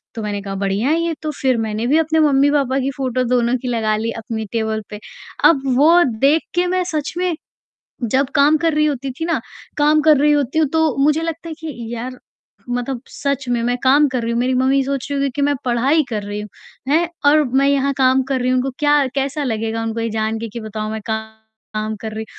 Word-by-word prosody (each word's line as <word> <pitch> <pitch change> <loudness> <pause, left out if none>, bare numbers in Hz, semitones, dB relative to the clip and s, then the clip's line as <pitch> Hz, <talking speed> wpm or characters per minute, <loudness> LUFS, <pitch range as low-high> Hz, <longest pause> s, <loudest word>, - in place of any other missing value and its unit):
तो 225 - -4
मैंने 205 -1 -3
कहा 195 -1 -5
बढ़िया 200 +6 -1
है 325 - +2
ये 335 0 -1
तो, 310 -1 -3
फ़िर 260 -3 0
मैंने 220 0 -2
भी 295 - +3
अपने 320 0 +2
मम्मी-पापा 280 -2 +3
की 270 +1 -1
फ़ोटो 255 -2 -1
दोनों 245 0 +2
की 255 - -5
लगा 220 -3 0
ली 225 +2 -2
अपनी 220 0 -5
टेबल 220 -1 -1
पे, 210 - -7 0.4
अब 280 -5 +5
वो 330 +6 +6 0.2
देख 290 +5 +4
के 355 +1 +2
मैं 365 0 +1
सच 310 -5 -3
में 360 -1 0 0.8
जब 265 +2 +1
काम 295 +2 +5
कर 330 0 +1
रही 305 0 +2
होती 275 -2 -2
थी 325 - -1
ना 330 -5 0 0.4
काम 300 +1 +4
कर 305 -2 +5
रही 295 +2 +3
होती 290 +1 +1
हूँ 310 - +3
तो 320 -4 +2
मुझे 300 +2 +3
लगता 330 0 -4
है 320 - -5
कि 290 -8 -7
यार 250 +2 -5 0.5
मतलब 245 0 -3
सच 280 -2 -3
में 240 -1 +1
मैं 245 +1 0
काम 285 +3 +5
कर 255 -2 -2
रही 230 - -1
हूँ, 235 - 0
मेरी 255 +1 +1
मम्मी 265 +2 +2
सोच 275 0 -3
रही 280 - -1
होगी 275 0 +1
कि 290 - -1
मैं 285 0 +2
पढ़ाई 260 +6 +2
कर 210 -3 -3
रही 205 0 -5
हूँ, 210 - -9 0.4
हैं, 330 +3 +2 0.2
और 300 +1 +5
मैं 270 +2 +2
यहाँ 280 0 +2
काम 260 0 +3
कर 265 - 0
रही 250 - 0
हूँ, 255 - +2
उनको 265 +2 -1
क्या 290 -1 +3
कैसा 280 +2 -1
लगेगा 225 -2 -2
उनको 225 0 -3
ये 230 - -1
जान 220 0 -2
के 230 0 -5
कि 235 +3 -7
बताओ 215 0 -5
मैं 220 0 -4
काम 220 0 -6
कर 220 - -5
रही, 220 +1 -5
265 Hz, 235 wpm, -19 LUFS, 225-295 Hz, 0.8 s, वो